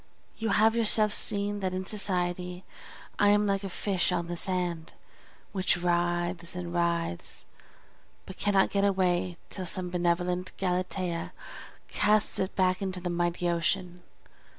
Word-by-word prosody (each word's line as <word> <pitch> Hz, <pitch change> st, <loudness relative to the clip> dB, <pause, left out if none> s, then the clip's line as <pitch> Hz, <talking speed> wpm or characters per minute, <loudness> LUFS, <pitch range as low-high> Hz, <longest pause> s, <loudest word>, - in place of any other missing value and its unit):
You 225 Hz, 0 st, -3 dB
have 220 Hz, +2 st, +3 dB
yourself 215 Hz, -2 st, +7 dB
seen 205 Hz, 0 st, +2 dB
that 185 Hz, -2 st, -3 dB
in 185 Hz, 0 st, -4 dB
society 180 Hz, -3 st, 0 dB, 0.6 s
I 205 Hz, -, +4 dB
am 205 Hz, 0 st, +3 dB
like 200 Hz, -1 st, -1 dB
a 195 Hz, -, -4 dB
fish 190 Hz, 0 st, -1 dB
on 175 Hz, -1 st, -1 dB
the 175 Hz, +1 st, -5 dB
sand, 175 Hz, -2 st, -3 dB, 0.6 s
which 190 Hz, -2 st, 0 dB
writhes 175 Hz, 0 st, -1 dB
and 175 Hz, -1 st, -6 dB
writhes, 170 Hz, -, -2 dB, 0.8 s
but 190 Hz, -, -10 dB
cannot 200 Hz, -1 st, +1 dB
get 200 Hz, 0 st, 0 dB
away 185 Hz, -3 st, 0 dB
till 185 Hz, -2 st, -2 dB
some 180 Hz, 0 st, +1 dB
benevolent 180 Hz, +1 st, -1 dB
Galatea 180 Hz, -2 st, -2 dB, 0.5 s
casts 210 Hz, 0 st, +1 dB
it 190 Hz, 0 st, -3 dB
back 185 Hz, 0 st, +1 dB
into 190 Hz, -2 st, -2 dB
the 180 Hz, 0 st, -4 dB
mighty 175 Hz, 0 st, -1 dB
ocean. 175 Hz, +1 st, -1 dB
180 Hz, 140 wpm, -28 LUFS, 175-195 Hz, 0.8 s, yourself